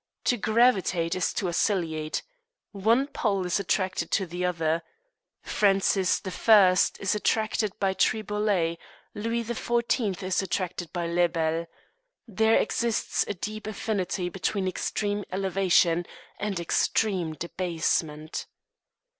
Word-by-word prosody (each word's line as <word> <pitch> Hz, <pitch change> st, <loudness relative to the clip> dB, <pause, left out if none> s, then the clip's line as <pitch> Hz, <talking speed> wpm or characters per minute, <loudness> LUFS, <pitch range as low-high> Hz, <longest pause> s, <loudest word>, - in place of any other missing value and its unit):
To 245 Hz, -, +2 dB
gravitate 215 Hz, -7 st, +2 dB
is 185 Hz, -, 0 dB
to 190 Hz, -, -1 dB
oscillate. 165 Hz, -4 st, -1 dB, 0.5 s
One 225 Hz, +6 st, +2 dB
pole 200 Hz, -9 st, -1 dB
is 180 Hz, +2 st, 0 dB
attracted 190 Hz, -1 st, -1 dB
to 195 Hz, -, +2 dB
the 175 Hz, +1 st, -5 dB
other. 165 Hz, -2 st, 0 dB, 0.6 s
Francis 195 Hz, -2 st, +2 dB
I. 190 Hz, -1 st, +5 dB, 0.2 s
is 195 Hz, -, 0 dB
attracted 215 Hz, -1 st, 0 dB
by 195 Hz, -1 st, +1 dB
Triboulet; 205 Hz, -5 st, 0 dB, 0.3 s
Louis 230 Hz, +2 st, -2 dB
XIV. 235 Hz, -3 st, -1 dB
is 185 Hz, +1 st, 0 dB
attracted 180 Hz, -2 st, -3 dB
by 175 Hz, -2 st, -2 dB
Lebel. 170 Hz, -1 st, 0 dB, 0.6 s
There 220 Hz, +1 st, +3 dB
exists 230 Hz, -1 st, 0 dB
a 205 Hz, -, -3 dB
deep 215 Hz, +3 st, -6 dB
affinity 200 Hz, -4 st, -2 dB
between 190 Hz, +1 st, -2 dB
extreme 205 Hz, +2 st, -2 dB
elevation 185 Hz, -2 st, +2 dB, 0.3 s
and 200 Hz, -3 st, -2 dB
extreme 175 Hz, 0 st, 0 dB
debasement. 160 Hz, -3 st, -2 dB
190 Hz, 110 wpm, -27 LUFS, 175-215 Hz, 0.6 s, I